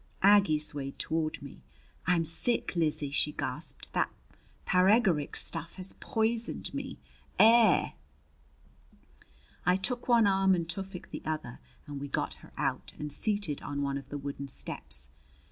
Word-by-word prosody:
Aggie 200 -6 +6
swayed 145 -2 -2
toward 160 -1 -1
me. 140 - -10 0.5
"I'm 170 -2 +3
sick, 180 +7 0
Lizzie!" 150 -4 0
she 150 +1 +1
gasped. - - -4
"That - - +1 0.6
paregoric 185 -5 +3
stuff 165 0 -2
has 185 0 -3
poisoned 225 0 -1
me. - - -5 0.4
Air!" 225 0 +6 1.7
I 180 +1 +4
took 245 +6 -1
one 235 -3 +5
arm 195 -1 +4
and 170 -2 -2
Tufik 190 +1 -6
the - - -5
other, 155 -6 -4 0.3
and 145 -1 -6
we 145 - -4
got - - -2
her - - -15
out - - -2
and 150 -1 -4
seated 205 -9 0
on 145 0 -3
one 140 0 -1
of 135 - -14
the 145 - -4
wooden 140 0 -5
steps. 65 - -4
165 Hz, 145 wpm, -30 LUFS, 145-200 Hz, 1.7 s, Aggie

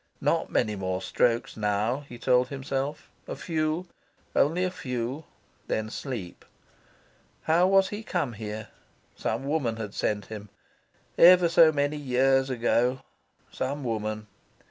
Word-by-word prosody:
Not - - +1
many 105 -1 +1
more 95 -1 -2
strokes 120 +3 0
now, 105 +4 0
he 120 - -9
told 125 +1 +3
himself; 135 +1 -4 0.2
a - - -4
few, 160 +1 -2 0.5
only 165 +6 +3
a 185 - 0
few; 130 -1 -4 0.4
then 110 0 -2
sleep. 115 -12 -6 1.0
How 170 +3 +4
was 195 0 +4
he 210 +1 -5
come 145 - -2
here? 110 0 -6 0.5
Some 115 +5 -2
woman 140 -6 0
had 105 -3 -6
sent 105 -2 -1
him. 105 -1 -8 0.7
Ever 180 0 +8
so 165 -1 +7
many 145 0 0
years 135 -1 +2
ago, 125 +1 +1 0.5
some 140 +2 -3
woman. 110 -2 -3
130 Hz, 130 wpm, -27 LUFS, 110-155 Hz, 1.0 s, Ever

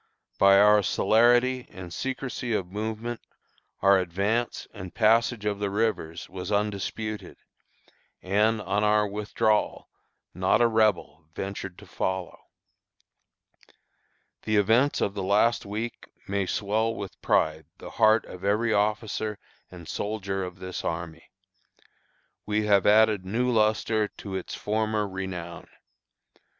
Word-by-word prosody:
"By 100 0 +7
our 105 +1 +6
celerity 120 +6 +3
and 90 -2 -9
secrecy 130 -2 -3
of 95 -4 -2
movement, 110 +3 -4 0.6
our 100 0 +6
advance 100 +7 -1
and 95 -5 -9
passage 115 0 +3
of 105 -1 -1
the 100 -1 -1
rivers 100 -6 -2
was 90 +1 -7
undisputed, 105 +1 -3 0.8
and, 105 +4 +1
on 100 +3 0
our 105 0 +3
withdrawal, 105 +1 -1 0.4
not 95 +2 +2
a 120 - +5
Rebel 105 -8 +1
ventured 95 -1 -5
to - - -13
follow. 95 -1 -4 2.0
"The 110 - -1
events 115 +8 +3
of 100 - 0
the 100 - -4
last 100 +4 +2
week 110 +3 -5 0.2
may 100 -1 -1
swell 110 +4 0
with 100 -2 -8
pride 80 -1 +1
the - - -10
heart 110 0 +4
of 90 0 -11
every 110 +3 +1
officer 105 0 -1 0.3
and 85 -3 -12
soldier 100 -2 -3
of 90 -1 -7
this 95 0 -6
army. 80 -1 -5 1.2
We 105 0 0
have 100 -2 +3
added 105 -2 +5
new 120 +7 0
lustre 110 -1 +2
to 100 -1 -10
its 95 -1 -4
former 110 0 -1
renown. 95 -3 -6
105 Hz, 125 wpm, -26 LUFS, 95-110 Hz, 2.0 s, By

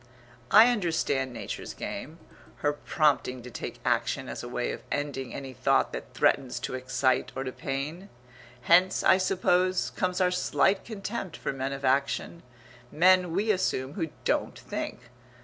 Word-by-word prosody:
I 220 - +8
understand 165 - 0
Nature's 110 -5 -6
game - - -6 0.5
her 145 - +3
prompting 145 -5 0
to 125 - -9
take 120 +1 -6
action 125 +2 0
as - - -5
a 120 - -7
way 120 0 -2
of - - -6
ending 140 -3 -3
any 135 -1 -7
thought - - +2
that - - -7
threatens 130 -3 +2
to - - -4
excite 130 0 0
or 135 - -2
to 130 - -4
pain. 145 +10 -5 0.5
Hence, 175 +8 +4
I 185 - +6
suppose, 185 0 +1
comes 180 0 -1
our 180 -1 +3
slight 190 +2 +2
contempt 205 -3 -5
for - - -3
men 135 0 -3
of 135 0 -4
action 140 +5 0 0.5
men, 180 +1 +4
we 205 +6 +1
assume, 140 -8 -1
who 165 -3 -2 0.2
don't - - 0
think. - - -5
145 Hz, 155 wpm, -28 LUFS, 130-185 Hz, 0.5 s, I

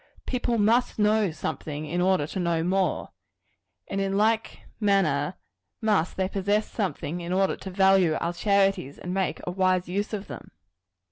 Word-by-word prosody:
People 245 -2 -1
must 225 +4 +2
know 210 -1 +3
something, 155 -1 -5
in 175 +4 -1
order 185 -4 +2
to 170 - -5
know 170 -2 0
more; 190 +2 0 0.8
and 195 - -2
in 195 0 0
like 220 +2 +1 0.2
manner, 185 -7 +2 0.4
must 210 -7 +1
they 190 -1 +1
possess 200 +2 0
something, 175 -4 -3
in 170 +1 -5
order 190 +1 +2
to 190 - -8
value 190 -3 +4
our 170 +1 -2
charities, 195 -6 +1
and 180 - -5
make 190 -1 -1
a 180 - -3
wise 185 -1 +1
use 200 +4 -2
of 210 -2 -4
them. - - -9
190 Hz, 160 wpm, -26 LUFS, 175-205 Hz, 0.8 s, value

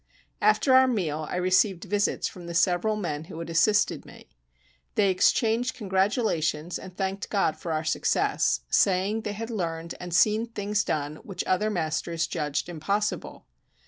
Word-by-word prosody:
After 265 - +4
our 260 0 +7
meal 160 -10 -1
I - - -3
received 185 0 +2
visits 205 +1 0
from 175 -3 -10
the 170 - -5
several 185 +4 +2
men 160 -7 -4
who 160 - -10
had 165 0 -6
assisted 210 +6 +2
me. - - -15 0.7
They 200 -2 +3
exchanged 225 +6 +2
congratulations 190 -6 0
and 185 -1 -11
thanked 195 0 -3
God 195 -6 +1
for 170 - -6
our 155 0 -1
success, 155 - +1
saying 195 +3 +2
they 210 - -4
had 225 +3 -6
learned 170 -5 -3
and 180 -1 -7
seen 215 +6 +3
things 205 -2 -1
done 150 0 -2
which 195 +2 -6
other 200 +4 +1
masters 165 -2 -1
judged 150 -2 -2
impossible. 200 +5 -3
185 Hz, 155 wpm, -26 LUFS, 165-210 Hz, 0.7 s, our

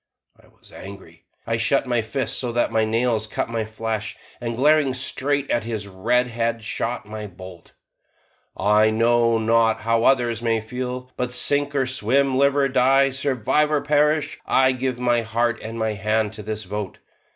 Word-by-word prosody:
I - - -22
was - - -19
angry. 100 0 -12 0.2
I 115 0 -1
shut 135 +4 +2
my 120 -2 0
fists 110 +5 -3
so 125 -2 -2
that 120 - 0
the 110 -1 +2
nails 115 -1 0
cut 110 - -3
my 115 -1 -2
flesh, 110 0 -4 0.2
and 120 -1 -3
glaring 145 0 +3
straight 140 +1 -1
at 120 - 0
his 110 -3 -4
red 115 +6 0
head 115 -1 -2
shot 115 +1 -3
my 105 0 -7
bolt: 95 -2 -13 0.8
"I 105 +2 +3
know 115 +1 +2
not 110 0 +2
how 115 +1 +1
others 120 -4 +2
may 115 -1 +1
feel, 125 +3 -6
but 125 -1 -2
sink 145 +3 +4
or 135 -2 +1
swim, 130 +2 +1
live 140 +1 +3
or 140 -1 +2
die, 135 +1 +3
survive 140 +2 0
or 150 -2 +1
perish, 150 +1 +1
I 130 0 +4
give 130 -1 -3
my 120 -1 +1
heart 115 +1 -1
and 115 +1 -7
my 110 -1 -1
hand 110 +1 -1
to 105 - -8
this 110 +1 -4
vote. 100 +1 -6
115 Hz, 175 wpm, -22 LUFS, 110-130 Hz, 0.8 s, sink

